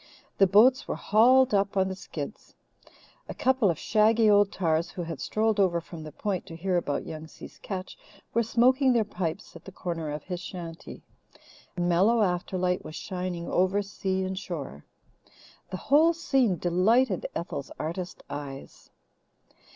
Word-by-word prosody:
The 195 - +6
boats 230 +8 +5
were - - -2
hauled 250 +4 +4
up 200 0 +1
on 190 0 +3
the 190 - -4
skids. 165 -1 -8 0.7
A - - -5
couple 260 -5 +2
of 165 - 0
shaggy 220 +2 +3
old 205 0 +4
tars, 165 -3 0
who 175 - -5
had 165 -1 -6
strolled 220 -1 0
over 180 -3 +3
from 165 -1 -10
the 155 0 -8
Point 190 +4 -3
to 165 - -8
hear 185 +2 -1
about 160 -5 -1
Young 155 0 -7
Si's - - -13
catch, 185 -2 -6 0.3
were 235 - +3
smoking 255 +4 +3
their 235 -2 +3
pipes 185 -2 -5
at 170 - -12
the 195 - -10
corner 165 -4 -4
of 150 0 -5
his 180 -2 -5
shanty. 175 -2 -8 0.7
A - - -1
mellow 190 +7 +3
afterlight 180 0 -1
was 155 - -9
shining 180 -3 -4
over 190 +3 +1
sea 190 -1 -2
and 190 0 -3
shore. 145 - -7 0.9
The 185 - -4
whole 310 - +4
scene 265 - +1
delighted 190 +5 +2
Ethel's 140 -5 -4
artist 175 +3 -5
eyes. 140 -2 -8
185 Hz, 160 wpm, -27 LUFS, 170-215 Hz, 0.9 s, The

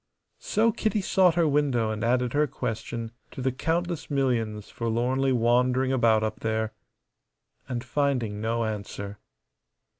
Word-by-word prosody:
So 225 +2 +2
Kitty 215 -1 0
sought 185 -3 +3
her 170 -2 +3
window 140 -7 +2
and 110 +1 -3
added 125 0 +1
her 150 +1 +3
question 115 -2 -4 0.2
to - - -10
the 130 +1 +1
countless 170 +5 -2
millions 115 -7 0
forlornly 125 +4 0
wandering 125 +2 +2
about 115 -4 +3
up 110 0 -2
there, 110 0 -1 1.0
and 120 -2 -3
finding 125 -5 -1
no 115 +1 0
answer. 100 -1 -5
125 Hz, 130 wpm, -27 LUFS, 110-140 Hz, 1.0 s, sought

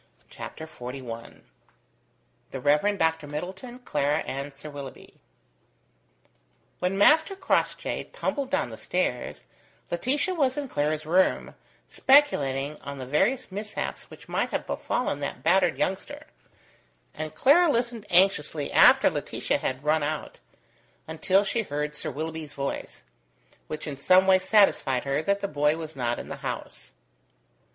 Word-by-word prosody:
CHAPTER 160 - -8
XLI 125 -5 -8 1.1
THE 135 - -6
REV. 150 +10 +2
DR. 160 -3 +1
MIDDLETON, 190 - -6
CLARA, 145 0 +1
AND 140 +2 -4
SIR 145 +2 -10
WILLOUGHBY 140 -2 -10 1.6
When 180 +2 -1
Master 315 - +5
Crossjay 380 -1 -1
tumbled 275 -2 -2
down - - 0
the - - -8
stairs, - - -2 0.5
Laetitia 280 - 0
was 275 -6 +1
in 290 -1 -3
Clara's 150 - -1
room, 180 +4 +2 0.3
speculating 150 - +3
on 140 0 -7
the 130 - -6
various 240 - +1
mishaps 210 +2 -5
which - - -14
might - - -1
have - - -3
befallen 245 - -2
that 140 - -5
battered 180 +1 +3
youngster; 190 +1 -3 0.9
and 155 0 -6
Clara 315 - +5
listened 235 -4 -1
anxiously 170 -5 +2
after - - +7
Laetitia - - -1
had 130 +1 -3
run 155 +1 +2
out, 150 +1 -4 0.7
until 185 +5 +2
she 225 +3 0
heard 150 -5 -3
Sir - - -4
Willoughby's 160 -1 -5
voice; 140 0 -5 0.6
which 155 0 -5
in 145 -3 -5
some 185 +7 +5
way 190 -1 +5
satisfied 185 - +3
her 140 +2 0
that 200 +4 0
the 200 - -1
boy 150 -1 +1
was 160 -1 -7
not 120 -2 -1
in - - -7
the - - -6
house. - - -7
160 Hz, 135 wpm, -26 LUFS, 145-205 Hz, 1.6 s, after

